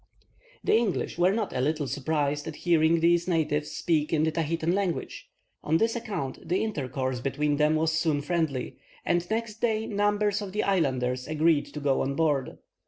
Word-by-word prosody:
The - - +3
English 220 -6 0
were 180 +2 +4
not 210 -1 -2
a 125 - 0
little 150 +2 0
surprised 145 +2 -1
at 160 - -5
hearing 165 -1 +4
these 170 +1 +3
natives 155 -3 0
speak 155 -3 0
in 155 -1 +2
the 160 - +2
Tahitan 165 +1 -1
language. 190 -3 -3 0.3
On 160 +2 +2
this 225 +5 +1
account 205 - -4
the 185 +4 0
intercourse 130 - -2
between 145 +3 0
them 150 +1 +3
was 160 +1 +1
soon 160 -2 +1
friendly, 155 -6 -2 0.3
and 175 0 0
next 225 0 -3
day 220 -2 +1
numbers 205 0 +1
of 195 -2 -6
the 210 - 0
islanders 130 -9 0
agreed 155 0 +2
to 150 - -7
go 140 -2 +1
on 140 +1 -1
board. 145 -4 0
160 Hz, 175 wpm, -27 LUFS, 145-190 Hz, 0.3 s, were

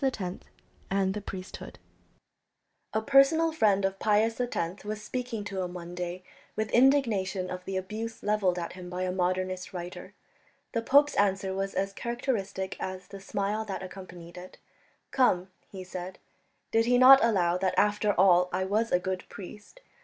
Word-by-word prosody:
X 265 -1 +1
PIUS 180 -3 -3
X - - -23 0.4
AND 195 -1 +1
THE 210 - -4
PRIESTHOOD 190 -2 -8 1.1
A 220 - 0
personal 280 +6 +5
friend 205 -10 +2
of 195 0 -2
Pius 220 +3 +2
X 190 -7 -3
was 210 0 -4
speaking 230 0 -4
to 195 -2 -4
him 180 0 -4
one 175 0 -7
day 180 +1 -5 0.3
with 215 0 -2
indignation 220 -8 +2
of 180 0 -5
the 195 -1 -3
abuse 215 +4 -5
levelled 205 -4 +1
at 170 -1 -4
him 180 -1 -9
by 180 +1 -3
a 185 - -1
Modernist 185 0 -2
writer. 175 0 -7 0.6
The 230 - -1
pope's 285 +5 +4
answer 195 -1 +1
was 195 0 -3
as 195 +1 -1
characteristic 210 -5 -3
as 185 0 -6
the 195 - -9
smile 200 +2 -2
that 195 -2 -5
accompanied 180 -2 -10
it. 180 +1 -12 0.5
"Come," 185 -8 +2 0.2
he 190 -2 -7
said, 185 0 -7 0.5
"did 225 0 +3
he 245 0 +4
not 260 +1 +9
allow 180 -6 +2
that 190 -1 0
after 210 0 +2
all 180 -1 +5
I 185 +1 0
was 215 +4 0
a - - +5
good 185 +1 -4
priest? 205 - -11
195 Hz, 170 wpm, -28 LUFS, 185-220 Hz, 1.1 s, not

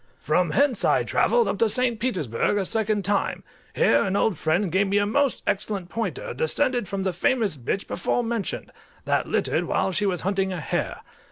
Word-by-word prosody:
From 170 +3 +1
hence 275 - +1
I - - +3
travelled 475 -1 +2
up - - -2
to 230 - +3
St. 240 0 +1
Petersburg 185 - 0
a 195 - 0
second 215 -1 -1
time: 205 -1 0 0.3
here - - +4
an 195 0 -1
old 205 -1 +2
friend 165 +5 0
gave 195 +2 +2
me 200 +1 +1
a 205 - +3
most 270 +5 +1
excellent 200 -2 -2
pointer, 350 - -3
descended 260 - +1
from 195 +1 -3
the 190 -1 -1
famous 215 +1 +1
bitch 140 +9 -3
before 245 - -1
mentioned, 230 -3 -3 0.3
that - - +1
littered - - 0
while 190 - 0
she 205 +2 +1
was 180 -3 -1
hunting 195 0 0
a 180 - -3
hare. 150 - -3
205 Hz, 190 wpm, -24 LUFS, 190-230 Hz, 0.3 s, here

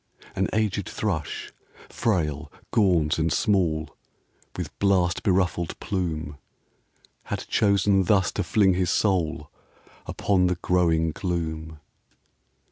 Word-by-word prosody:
An - - +1
aged 105 -2 -1
thrush, 85 -8 -3 0.4
frail, 80 -8 -1 0.2
gaunt 85 -8 +2
and 80 0 +1
small, 80 -1 +1 0.6
With - - -6
blast 95 -3 +2
beruffled 90 -4 0
plume, 80 -7 -3 0.9
Had - - -4
chosen 100 -2 +3
thus 95 -1 +3
to - - -2
fling 95 +1 +3
his 90 0 0
soul 85 -7 0 0.6
Upon 95 -3 +1
the 90 - +1
growing 85 -2 +1
gloom. 80 -3 -4
90 Hz, 105 wpm, -25 LUFS, 80-95 Hz, 0.9 s, chosen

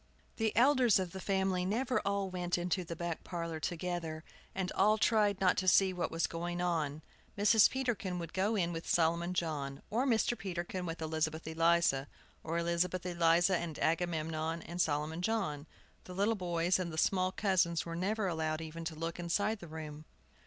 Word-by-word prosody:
The 225 -1 +1
elders 255 -3 +5
of 185 -2 -2
the 190 - -7
family 190 -1 0
never 245 +7 0
all 200 0 0
went 180 -1 -1
into 180 +1 -1
the 170 0 -6
back 170 0 -4
parlor 170 -2 -4
together, 165 -1 -3 0.3
and 190 -1 -2
all 210 +3 +3
tried 210 -2 +3
not 185 -2 +3
to 185 - -1
see 190 0 +5
what 180 - -2
was 165 0 0
going 175 +1 -4
on. 160 -4 -1 0.3
Mrs. 210 +1 +6
Peterkin 230 -9 -2
would 170 -2 -6
go 195 +5 +1
in 175 -4 +1
with 165 0 -6
Solomon 170 +2 +2
John, 145 -5 -3
or 245 +6 +1
Mr. 240 0 +2
Peterkin 180 -2 -4
with 165 0 -4
Elizabeth 160 0 -2
Eliza, 165 -4 +2 0.4
or 165 +1 -2
Elizabeth 170 +1 0
Eliza 175 +1 +3
and 170 -3 -5
Agamemnon 165 -1 -1
and 175 +1 -3
Solomon 155 +2 -1
John. 180 -8 -1 0.4
The 180 - -9
little 205 +4 +2
boys 175 -2 0
and 175 -2 -3
the 155 - -7
small 185 +2 +2
cousins 185 -4 +1
were 165 0 -5
never 200 +4 -1
allowed 160 -3 -1
even 165 +1 -7
to 160 -1 -4
look 165 +2 -4
inside 200 +5 0
the 175 - -10
room. 155 -1 -8
175 Hz, 180 wpm, -33 LUFS, 165-190 Hz, 0.4 s, Mrs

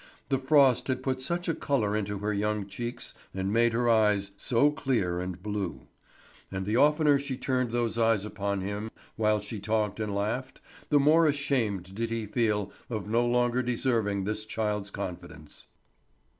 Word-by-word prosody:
The 135 -2 +2
frost 135 -2 +4
had 130 -1 -1
put 130 -1 -1
such 170 +6 -2
a 165 - +2
colour 115 -10 0
into 105 -1 -2
her 105 +2 -2
young 105 0 -1
cheeks, 120 +4 -5 0.2
and 95 +1 -1
made 120 +1 +4
her 120 +1 +1
eyes 105 -3 +3
so 125 +7 +2
clear 115 - 0
and 90 0 -5
blue; 100 -10 -3 0.7
and 95 0 -3
the 105 +3 0
oftener 150 +1 +4
she 140 -2 -4
turned 130 -2 0
those 120 -1 -1
eyes 115 -3 +3
upon 100 -2 -2
him 100 +3 -4 0.3
while 105 -1 +2
she 105 +1 -6
talked 105 0 -1
and 105 -2 -2
laughed 115 +6 -2 0.3
the 145 - +5
more 155 +3 +5
ashamed 115 -11 -1
did 115 +3 -2
he 115 -1 -2
feel 105 -2 0 0.2
of 110 -4 -4
no 115 +3 +2
longer 120 +1 +2
deserving 115 -5 0
this 105 +2 -2
child's 105 -2 -2
confidence. 85 -6 -8
110 Hz, 170 wpm, -28 LUFS, 100-125 Hz, 0.7 s, the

